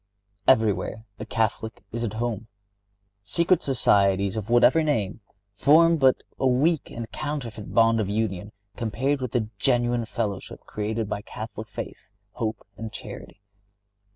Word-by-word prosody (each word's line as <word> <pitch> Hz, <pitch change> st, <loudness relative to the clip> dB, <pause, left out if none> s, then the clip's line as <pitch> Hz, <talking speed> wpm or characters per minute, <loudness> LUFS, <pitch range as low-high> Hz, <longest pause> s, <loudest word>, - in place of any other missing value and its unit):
Everywhere 110 Hz, -2 st, +2 dB
a 110 Hz, -, -6 dB
Catholic 110 Hz, 0 st, -1 dB
is 115 Hz, +1 st, -3 dB
at 110 Hz, -3 st, -2 dB
home. 115 Hz, -1 st, -3 dB, 0.7 s
Secret 170 Hz, -, +2 dB
societies, 100 Hz, -6 st, +3 dB
of 110 Hz, 0 st, -4 dB
whatever 120 Hz, +6 st, +5 dB
name, 115 Hz, -9 st, -1 dB, 0.3 s
form 165 Hz, +9 st, +5 dB
but 135 Hz, -3 st, +4 dB, 0.2 s
a 135 Hz, -, +3 dB
weak 145 Hz, +5 st, +2 dB
and 115 Hz, -1 st, -6 dB
counterfeit 135 Hz, -8 st, -5 dB
bond 115 Hz, 0 st, +4 dB
of 100 Hz, -3 st, -1 dB
union 105 Hz, -2 st, -2 dB, 0.2 s
compared 130 Hz, +5 st, -1 dB
with 125 Hz, -3 st, -3 dB
the 110 Hz, -4 st, 0 dB
genuine 120 Hz, -1 st, +2 dB
fellowship 110 Hz, -4 st, -4 dB
created 110 Hz, +1 st, -3 dB
by 100 Hz, -, -3 dB
Catholic 110 Hz, +1 st, -7 dB
faith, 105 Hz, -, -7 dB, 0.2 s
hope 110 Hz, 0 st, -3 dB
and 110 Hz, +1 st, -6 dB
charity. 100 Hz, -, -9 dB
115 Hz, 135 wpm, -25 LUFS, 105-130 Hz, 0.7 s, whatever